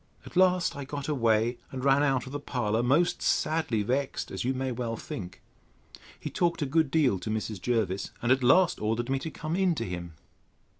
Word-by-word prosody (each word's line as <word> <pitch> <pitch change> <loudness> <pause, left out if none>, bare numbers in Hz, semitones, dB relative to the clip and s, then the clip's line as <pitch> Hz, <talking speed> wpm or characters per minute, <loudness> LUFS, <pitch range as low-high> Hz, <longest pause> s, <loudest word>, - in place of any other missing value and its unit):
—At - - -12
last 185 -1 +3
I 140 - -5
got 140 +1 -5
away, 120 -4 +1
and 130 0 -5
ran 140 +1 +5
out 135 -3 +1
of 130 - -9
the 145 - -3
parlour, 120 -5 -1
most 145 +8 +2
sadly 155 -9 +1
vexed, 130 +5 -2
as - - -3
you 130 +2 0
may 130 0 -2
well 115 -1 -3
think. 90 -4 -8 0.8
He - - -5
talked 170 -3 0
a - - 0
good 155 +2 +2
deal 135 - +2
to 90 - -5
Mrs. 110 -2 -3
Jervis, 105 -5 0
and 120 - 0
at 130 +1 +4
last 165 +8 +4
ordered 115 +4 -1
me 135 - +1
to 160 - -5
come 155 +1 -4
in 185 -2 +2
to - - -3
him. 85 -2 -6
130 Hz, 205 wpm, -28 LUFS, 115-150 Hz, 0.8 s, ran